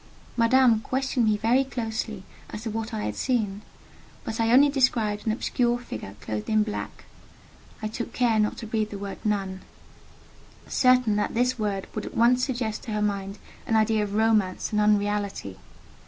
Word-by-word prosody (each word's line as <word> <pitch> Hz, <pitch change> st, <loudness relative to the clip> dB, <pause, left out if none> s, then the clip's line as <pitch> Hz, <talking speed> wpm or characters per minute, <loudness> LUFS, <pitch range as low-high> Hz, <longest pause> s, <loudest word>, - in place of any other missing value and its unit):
Madame 235 Hz, -1 st, +4 dB
questioned 255 Hz, 0 st, 0 dB
me 210 Hz, -1 st, +3 dB
very 235 Hz, +5 st, +3 dB
closely 220 Hz, -5 st, -4 dB, 0.3 s
as 210 Hz, -, -7 dB
to 225 Hz, -, -3 dB
what 225 Hz, +1 st, -4 dB
I 215 Hz, -2 st, -3 dB
had -, -, -3 dB
seen, 215 Hz, -6 st, -1 dB, 0.6 s
but 225 Hz, -, -5 dB
I 225 Hz, 0 st, +2 dB
only 275 Hz, +4 st, +7 dB
described 230 Hz, -6 st, +1 dB
an -, -, +3 dB
obscure 240 Hz, +1 st, 0 dB
figure 110 Hz, -, -8 dB
clothed 105 Hz, -1 st, -4 dB
in 215 Hz, -1 st, +3 dB
black: 210 Hz, -1 st, -6 dB, 0.8 s
I -, -, 0 dB
took 225 Hz, +2 st, -5 dB
care 235 Hz, -3 st, +2 dB
not 210 Hz, 0 st, +1 dB
to 230 Hz, -, -6 dB
breathe 220 Hz, -1 st, -1 dB
the 205 Hz, -, -6 dB
word 200 Hz, 0 st, -6 dB
"nun," 195 Hz, -3 st, -1 dB, 1.1 s
certain 250 Hz, -5 st, +3 dB
that 210 Hz, -, -1 dB
this 250 Hz, +1 st, +1 dB
word 200 Hz, -3 st, -1 dB
would 215 Hz, -, -4 dB
at -, -, -8 dB
once 245 Hz, +2 st, +4 dB
suggest 240 Hz, -5 st, -2 dB
to 220 Hz, -, -4 dB
her 210 Hz, -, -1 dB
mind 200 Hz, -1 st, -2 dB, 0.3 s
an 225 Hz, -, +1 dB
idea 220 Hz, -1 st, +3 dB
of 205 Hz, 0 st, -4 dB
romance 215 Hz, -4 st, +1 dB
and 210 Hz, -1 st, +2 dB
unreality. 205 Hz, -, 0 dB
220 Hz, 175 wpm, -26 LUFS, 210-240 Hz, 1.1 s, only